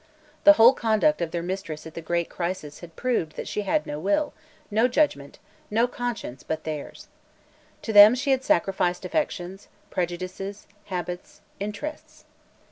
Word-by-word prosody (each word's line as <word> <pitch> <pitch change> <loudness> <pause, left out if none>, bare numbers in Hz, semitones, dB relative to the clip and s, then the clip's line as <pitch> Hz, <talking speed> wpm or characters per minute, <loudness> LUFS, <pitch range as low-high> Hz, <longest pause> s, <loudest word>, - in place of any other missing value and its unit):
The 300 - +11
whole 240 -1 +7
conduct 230 +7 +2
of 170 - -1
their 170 0 -3
mistress 175 -4 -5
at 160 - -9
the 165 - -6
great 170 +1 -1
crisis 170 -4 -5
had 170 -2 -12
proved 230 -11 -1
that - - -6
she 210 - -2
had 300 +10 0
no 150 - -5
will, 205 - 0 0.4
no 220 +4 +4
judgment, 245 - 0 0.3
no 225 +3 +3
conscience, 240 - -5
but 160 0 -4
theirs. 155 -2 -6 0.8
To 220 - -3
them 205 +3 +10
she 275 +2 0
had 265 0 +2
sacrificed 180 -3 +1
affections, 190 - -3 0.2
prejudices, 185 +3 -4 0.2
habits, 180 -1 -6 0.2
interests. 210 +10 -6
190 Hz, 150 wpm, -25 LUFS, 170-235 Hz, 0.8 s, The